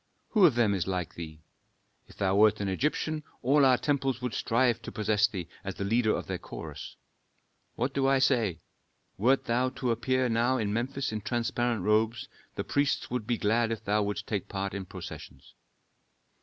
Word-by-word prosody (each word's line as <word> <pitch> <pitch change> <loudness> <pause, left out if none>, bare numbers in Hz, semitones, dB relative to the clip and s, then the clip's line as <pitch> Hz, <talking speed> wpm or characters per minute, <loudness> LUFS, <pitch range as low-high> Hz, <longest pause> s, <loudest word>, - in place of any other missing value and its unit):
Who 205 -5 +6
of 140 - +1
them 115 -4 +3
is 95 -2 -1
like 90 -3 -2
thee? 80 -2 -9 0.6
If - - -16
thou 95 0 +1
wert 105 +1 +5
an 100 - -2
Egyptian, 150 +9 -1 0.2
all 140 +3 +4
our 130 -2 +6
temples 135 -3 0
would 125 -3 -3
strive 120 0 +1
to - - -7
possess 105 0 +2
thee 95 -7 -6 0.2
as - - -5
the - - -4
leader 110 +2 +2
of - - -4
their - - -4
chorus. - - -8 0.8
What 125 +3 -1
do 135 -1 +1
I 135 0 +4
say? 120 -9 +2 0.6
Wert 130 +6 +3
thou 125 +2 +1
to 130 -1 -2
appear 130 +3 +1
now 120 +3 +2
in 105 -4 -1
Memphis 130 +4 -2
in 110 -1 -3
transparent 120 -2 -1
robes, 110 +3 +1 0.3
the - - -2
priests 140 -3 0
would 125 -4 -2
be 120 - +1
glad 115 +2 +1
if 110 -1 -4
thou 105 +1 +2
wouldst 100 0 -2
take 105 -4 -3
part 100 0 -3
in 100 -1 -4
processions." - - -10
115 Hz, 185 wpm, -29 LUFS, 105-130 Hz, 0.8 s, Who